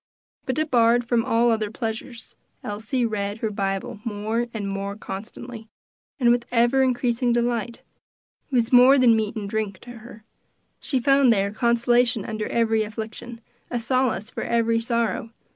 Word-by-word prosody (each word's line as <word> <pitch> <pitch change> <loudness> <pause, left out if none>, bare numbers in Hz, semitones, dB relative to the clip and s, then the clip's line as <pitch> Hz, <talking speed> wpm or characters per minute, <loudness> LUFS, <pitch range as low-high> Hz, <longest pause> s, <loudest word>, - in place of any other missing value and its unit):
But 260 - -1
debarred 245 -6 +2
from 235 -1 +2
all 230 +1 +2
other 215 -2 0
pleasures, 225 +2 -6 0.3
Elsie 220 +4 -2
read 205 -2 -2
her 220 -1 -2
Bible 195 0 -3
more 220 +2 -2
and 210 -3 -4
more 195 0 -4
constantly, 220 +3 -8 0.5
and 240 -2 +4
with 240 0 0
ever 240 +2 +3
increasing 245 -1 +1
delight; 235 -1 -1 0.7
it 275 - -3
was 240 0 +1
more 255 +3 +8
than 245 -3 +5
meat 220 0 -1
and 210 -2 -4
drink 205 -2 -3
to 245 -1 -11
her; 220 -1 -13 0.6
she 270 - -2
there 250 - -2 0.3
found 200 -2 +1
consolation 235 -1 +2
under 215 -1 -4
every 225 -1 +1
affliction, 220 +2 -7 0.3
a 245 - -2
solace 245 -2 -1
for - - -5
every 230 -1 +1
sorrow. 230 -1 -1
230 Hz, 155 wpm, -23 LUFS, 215-240 Hz, 0.7 s, more